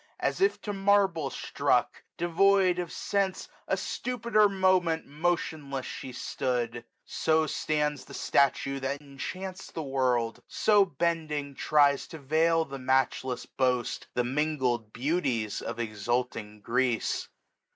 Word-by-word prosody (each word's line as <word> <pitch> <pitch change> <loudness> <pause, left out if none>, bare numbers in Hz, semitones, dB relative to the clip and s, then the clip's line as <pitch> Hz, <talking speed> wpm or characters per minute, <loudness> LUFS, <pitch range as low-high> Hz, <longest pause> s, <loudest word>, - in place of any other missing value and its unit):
As - - -1
if 390 +2 +3
to 205 - -3
marble 195 -6 +2
struck, - - 0 0.2
devoid 180 +1 +3
of 175 -2 -3
sense, 195 -2 -1 0.2
A - - +1
stupid 235 -2 -4
moment 185 -5 +3
motionless 150 -3 -2
she 130 - -6
stood: 120 -1 -2 0.3
1345 - - -40
So 160 0 +2
stands 150 -2 -1
the - - -12
statue 140 0 +2
that 135 +1 -2
enchants 180 +7 -7
the 160 - -4
world; 125 -4 0
So 205 -2 +4
bending 155 -3 -2
tries 145 0 +3
to 160 - -9
veil 160 +3 +2
the 135 -2 -7
matchless 130 -1 0
boast. 125 -2 -1
The 125 - +2
mingled 130 -4 0
beauties 125 - -1
of 115 - -5
exulting 115 -1 -2
Greece. 125 +1 0
145 Hz, 125 wpm, -28 LUFS, 130-175 Hz, 0.3 s, So